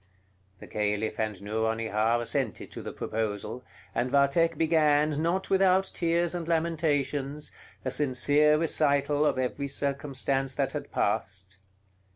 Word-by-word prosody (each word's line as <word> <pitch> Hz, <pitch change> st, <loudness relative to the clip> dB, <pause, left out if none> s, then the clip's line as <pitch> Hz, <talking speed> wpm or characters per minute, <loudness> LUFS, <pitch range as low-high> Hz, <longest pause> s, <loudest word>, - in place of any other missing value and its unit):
The -, -, -11 dB
Caliph 105 Hz, +1 st, -2 dB
and 110 Hz, -3 st, -2 dB
Nouronihar 110 Hz, +1 st, 0 dB
assented -, -, -2 dB
to -, -, -7 dB
the -, -, -6 dB
proposal, 110 Hz, +2 st, -4 dB, 0.3 s
and 120 Hz, +2 st, 0 dB
Vathek 145 Hz, +4 st, +3 dB
began, 155 Hz, -2 st, +2 dB
not 175 Hz, +4 st, -1 dB
without 190 Hz, 0 st, +3 dB
tears 170 Hz, 0 st, 0 dB
and 170 Hz, -2 st, -4 dB
lamentations, 150 Hz, -3 st, -1 dB, 0.3 s
a 130 Hz, -, -1 dB
sincere 145 Hz, +3 st, +3 dB
recital 145 Hz, -2 st, +2 dB
of 150 Hz, -, +2 dB
every 130 Hz, +2 st, -2 dB
circumstance 135 Hz, -1 st, -1 dB
that 135 Hz, -2 st, 0 dB
had -, -, -6 dB
passed. 95 Hz, 0 st, -2 dB
140 Hz, 125 wpm, -28 LUFS, 115-155 Hz, 0.3 s, Vathek